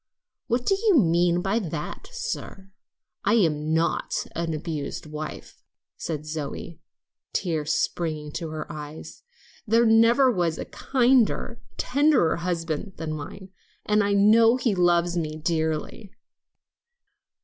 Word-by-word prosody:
"What 240 +1 0
do - - +3
you 395 -2 +3
mean 175 - +3
by 200 +4 +1
that, 165 - -6
sir? 475 - -6 0.5
I 205 +3 +3
am 155 -7 +1
not 165 +1 0
an 165 0 -2
abused 155 -2 -4
wife," 155 0 -8 0.3
said 155 -2 -5
Zoe, 155 +1 -6 0.5
tears 160 -5 -1
springing 155 -3 -2
to 165 0 -5
her 155 0 -5
eyes; 150 +1 -9 0.5
"there 230 +2 +4
never 230 +4 +5
was 175 -6 0
a - - -5
kinder, 245 -2 +1 0.2
tenderer 280 - +3
husband 170 +1 -3
than 160 -1 -4
mine, 155 +6 -8 0.4
and 210 0 +3
I 200 0 +1
know 225 +4 +6
he 245 -4 +1
loves 175 -1 +2
me 155 -2 -2
dearly." 160 +4 -2
175 Hz, 125 wpm, -25 LUFS, 155-225 Hz, 0.5 s, know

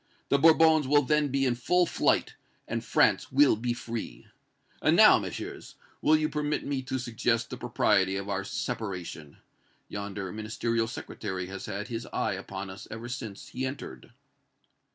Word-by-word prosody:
The 140 - +3
Bourbons 160 -1 +6
will 145 +1 +4
then 150 +2 +2
be 135 0 0
in 125 - +2
full 175 +9 +2
flight, - - +1 0.3
and - - -3
France - - +2
will 140 -1 +5
be 120 +3 -2
free! 115 - -6 0.6
And - - +4
now, - - +8
Messieurs, - - -7 0.3
will 155 - +5
you 155 0 +2
permit 150 -1 -2
me 140 -2 -1
to 130 0 -3
suggest 120 -1 -1
the 125 - -5
propriety 105 -5 +2
of 100 0 -4
our 100 -1 -2
separation? 90 -8 -5 0.5
Yonder 100 -2 -5
Ministerial 115 +2 -1
Secretary 95 -5 -5
has 95 +1 -7
had 105 +3 -5
his 115 -1 -4
eye - - 0
upon 95 0 -6
us 95 - -10
ever 115 +2 -7
since 110 -5 -7
he 130 - -4
entered." 130 - -6
115 Hz, 160 wpm, -28 LUFS, 100-135 Hz, 0.6 s, now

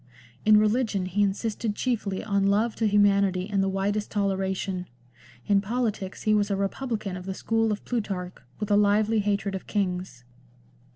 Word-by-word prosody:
In 215 0 +7
religion 215 -2 +1
he 185 +3 -1
insisted 210 +2 -1
chiefly 215 -7 -2
on 200 -2 +1
love 215 +3 +2
to 225 - +2
humanity 200 -2 +3
and 200 -2 0
the 195 - +1
widest 200 +2 -1
toleration. 190 -2 -1 0.6
In 200 -1 +3
politics 215 -3 -3
he 215 - +3
was 210 -1 +2
a 200 - +1
republican 200 0 -3
of 180 +1 -8
the 190 - -3
school 225 +1 0
of 210 - -4
Plutarch, 195 -6 -3 0.3
with 210 -1 -3
a - - +5
lively 210 +2 +3
hatred 200 -1 0
of 190 - -6
kings. 180 - -2
205 Hz, 165 wpm, -26 LUFS, 195-215 Hz, 0.6 s, In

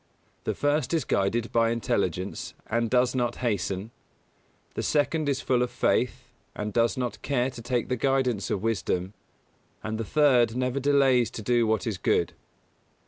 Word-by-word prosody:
The - - -1
first 145 +1 +1
is 155 -6 0
guided 110 +4 0
by 115 -1 +3
Intelligence 100 -5 -2
and 115 +1 0
does 125 +1 +3
not 120 -2 0
hasten; 100 -3 -2 0.8
the - - -3
second 150 0 +1
is 140 0 0
full 125 -2 +1
of 125 - +1
Faith, 125 0 0 0.3
and 105 0 -4
does 115 +1 +2
not 125 -4 -3
care 130 -2 0
to 120 - -9
take 120 0 -1
the 125 - 0
guidance 125 -5 0
of 100 - -2
Wisdom; 95 -3 -1 0.7
and 110 0 -3
the - - -1
third 125 -3 +3
never 125 +1 0
delays 135 -3 +3
to 110 - -7
do 120 +1 +2
what 110 +3 +1
is 105 -6 -3
good. - - +1
120 Hz, 165 wpm, -27 LUFS, 110-130 Hz, 0.8 s, by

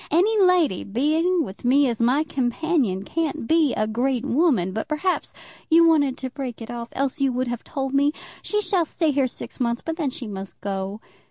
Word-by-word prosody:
Any 375 +8 +3
lady 360 - +3
being 315 - +1
with 195 -7 -9
me 270 +3 +4
as 235 -2 -2
my 255 +6 +3
companion 260 - 0
can't 320 -4 -2
be 315 0 +3
a 215 - +1
great 245 +3 -1
woman. 265 - +2
But 220 +8 -4
perhaps 315 +4 -1 0.4
you 335 +1 +6
wanted 285 -5 +3
to 260 -1 -5
break 260 -4 -6
it 230 0 -7
off; 235 -1 -6
else 275 0 -2
you 270 -1 +3
would 255 +1 -1
have 240 -1 -4
told 270 -1 -4
me. 285 +1 +3 0.3
She 420 0 -1
shall 365 -5 +1
stay 320 -1 0
here 275 -2 +2
six - - -8
months, 235 -1 -1
but 325 0 -3
then 305 -6 0
she 255 - -7
must 195 -2 -7
go. 195 +1 -4
270 Hz, 200 wpm, -23 LUFS, 235-320 Hz, 0.4 s, you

